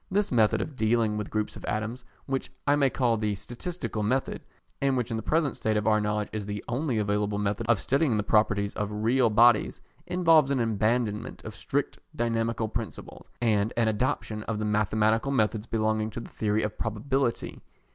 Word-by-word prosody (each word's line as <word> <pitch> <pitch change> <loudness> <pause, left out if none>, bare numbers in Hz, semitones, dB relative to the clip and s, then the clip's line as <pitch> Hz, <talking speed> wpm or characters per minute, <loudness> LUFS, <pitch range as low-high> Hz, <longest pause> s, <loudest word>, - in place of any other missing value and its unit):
This 200 +2 0
method 110 -4 +3
of 150 - -5
dealing 110 -2 +1
with 105 -1 -4
groups 105 -1 -2
of - - -10
atoms, 110 +4 -3 0.2
which 135 -1 -3
I 145 - +4
may 140 -2 +3
call 120 -3 +1
the 105 -1 -1
statistical 120 - -5
method, 130 +6 -1 0.4
and 135 -1 +2
which 120 -1 -2
in - - -1
the - - -3
present 150 +3 0
state 110 -1 0
of 105 - -1
our 110 -1 +3
knowledge 105 0 -1
is 105 -2 -4
the 105 0 -4
only 125 0 -1
available 105 0 0
method 105 +2 -1
of 120 -4 +4
studying 135 0 +1
the 105 - 0
properties 105 -1 +2
of 105 -1 -2
real 115 +4 +2
bodies, 115 +1 +4 0.3
involves 165 -5 +4
an 140 -2 +1
abandonment 110 -1 0
of - - -6
strict - - -2 0.2
dynamical 115 -1 0
principles, 110 0 -7 0.2
and 110 -1 +2
an 115 -1 +3
adoption 110 -1 -1
of 115 - -2
the 105 - -2
mathematical 110 +4 +1
methods 110 -3 0
belonging 110 -1 0
to 110 - -6
the 115 - -9
theory 110 0 0
of 105 - -4
probability. 120 +3 -1
110 Hz, 185 wpm, -27 LUFS, 105-125 Hz, 0.4 s, I